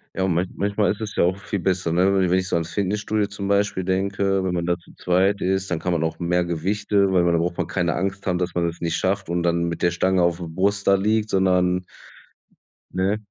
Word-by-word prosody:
Ja, 95 - 0
und 95 - +1
man 90 +3 0
manchmal 100 +1 +1
ist 105 - -6
es 105 -1 -5
ja - - +3
auch 90 +2 +1
viel 100 0 -4
besser, 90 -2 0
ne? 90 +3 +3
Wenn 95 -2 +2
wenn 95 +1 +3
ich 95 - -3
so - - -1
ans 85 0 -2
Fitnessstudio 105 +1 -1
zum 100 -1 -6
Beispiel 100 -1 +1
denke, 95 +1 0
wenn 90 -1 -1
man 85 -1 -1
da 85 0 +1
zu 85 - -19
zweit 95 +3 +1
ist, 95 +1 0
dann 85 -2 -1
kann 90 - -2
man 80 -1 0
auch 80 +2 -3
mehr 90 +1 +1
Gewichte 100 +4 0
weil 90 -2 +3
da 85 - +2
braucht 85 +1 -1
man 85 -3 -1
keine 85 -2 -1
Angst 95 +2 -3
haben, 90 -2 +1
dass 90 -1 -3
man 85 -1 +1
es 85 +1 -6
nicht 85 -1 -1
schafft 95 -1 -1
und 85 0 -1
dann 85 0 +1
mit 85 0 -4
der 85 - +3
Stange 95 +2 +1
auf 85 -1 +2
der 85 - -5
Brust 100 +5 -1
da 100 - +6
liegt, 110 +2 +1
sondern 90 -1 +2 1.1
ne? 95 +3 +1
95 Hz, 255 wpm, -23 LUFS, 85-100 Hz, 1.1 s, da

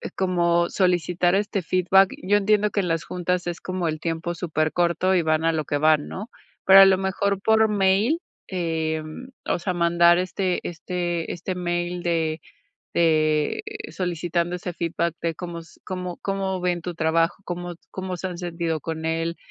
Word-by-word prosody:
como 170 -2 +2
solicitar 180 -1 +1
este 205 0 0
feedback? 185 +2 +3
Yo 205 +2 +3
entiendo 210 0 +2
que - - 0
en 190 - 0
las 165 -1 0
juntas 180 0 -2
es 175 -1 -3
como 185 -2 -2
el 155 -1 -2
tiempo 165 +1 -3
supercorto, 170 +2 0
y 180 - +3
van 155 -1 +1
a 165 - +4
lo 155 -2 -1
que 145 - -1
van, 155 0 +3
¿no?, 210 +5 -7 0.4
pero 195 0 +9
a - - +10
lo 190 -1 +4
mejor, 195 +1 -1
por 220 +1 +4
mail, 205 - +2 0.3
em, 160 +3 -3 0.2
o - - 0
sea, 180 +2 -2
mandar 170 0 +4
este 185 0 -1
este 175 -1 -3
este 180 +2 -4
mail 175 0 -2
de 160 -2 0 0.5
de 155 - +2 0.3
solicitando 175 -1 -2
ese 180 0 -5
feedback 170 0 -2
de 165 -1 -1
cómo 170 0 -6
s 165 - -17
cómo 180 -1 -5
cómo 195 -1 -2
ven 175 -1 -1
tu 175 0 -5
trabajo, 165 +1 +1
cómo 175 0 -5 0.2
cómo 185 -1 -4
se 185 - -4
han 180 -2 -5
sentido 170 -2 -2
con 160 0 -5
él, 165 +1 -1
175 Hz, 170 wpm, -24 LUFS, 165-185 Hz, 0.5 s, a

